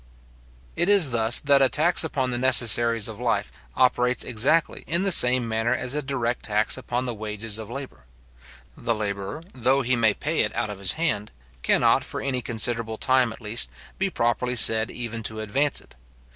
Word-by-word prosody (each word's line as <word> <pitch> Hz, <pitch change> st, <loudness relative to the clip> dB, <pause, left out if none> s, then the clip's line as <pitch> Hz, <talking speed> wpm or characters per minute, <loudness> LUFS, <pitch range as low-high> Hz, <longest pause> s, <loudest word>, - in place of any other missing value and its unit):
It 175 Hz, -, 0 dB
is 195 Hz, -10 st, +6 dB
thus 115 Hz, 0 st, +4 dB
that 140 Hz, -1 st, +3 dB
a 135 Hz, -, +4 dB
tax 170 Hz, +4 st, +2 dB
upon 130 Hz, -5 st, -2 dB
the 120 Hz, -, -2 dB
necessaries 120 Hz, -3 st, +3 dB
of 110 Hz, -1 st, -9 dB
life 115 Hz, -, -2 dB, 0.2 s
operates 125 Hz, -1 st, +1 dB
exactly 130 Hz, +8 st, 0 dB
in 170 Hz, +3 st, +1 dB
the 195 Hz, -, 0 dB
same 125 Hz, -6 st, +5 dB
manner 115 Hz, +2 st, -1 dB
as 125 Hz, +1 st, -2 dB
a 150 Hz, -, -2 dB
direct 125 Hz, -4 st, -3 dB
tax 105 Hz, 0 st, +1 dB
upon 125 Hz, -1 st, -4 dB
the 120 Hz, -, -3 dB
wages 105 Hz, 0 st, -6 dB
of 110 Hz, -1 st, -9 dB
labour. 125 Hz, -, -9 dB, 0.7 s
The 115 Hz, -1 st, -2 dB
labourer, 100 Hz, +7 st, -5 dB
though 130 Hz, +2 st, +1 dB
he 130 Hz, +1 st, 0 dB
may 110 Hz, -3 st, +1 dB
pay -, -, -3 dB
it -, -, -1 dB
out 105 Hz, -, -2 dB
of 100 Hz, -, -9 dB
his 95 Hz, -2 st, -3 dB
hand, 140 Hz, -11 st, -2 dB, 0.3 s
cannot, -, -, +2 dB
for -, -, -7 dB
any 130 Hz, -2 st, -3 dB
considerable 115 Hz, -1 st, -1 dB
time 130 Hz, -1 st, +1 dB
at 110 Hz, -, -11 dB
least, 110 Hz, +2 st, 0 dB, 0.3 s
be 195 Hz, 0 st, 0 dB
properly 125 Hz, -3 st, -1 dB
said 110 Hz, -1 st, +6 dB
even 115 Hz, -2 st, -6 dB
to 110 Hz, 0 st, -5 dB
advance 135 Hz, +7 st, 0 dB
it. -, -, -18 dB
120 Hz, 185 wpm, -24 LUFS, 110-130 Hz, 0.7 s, is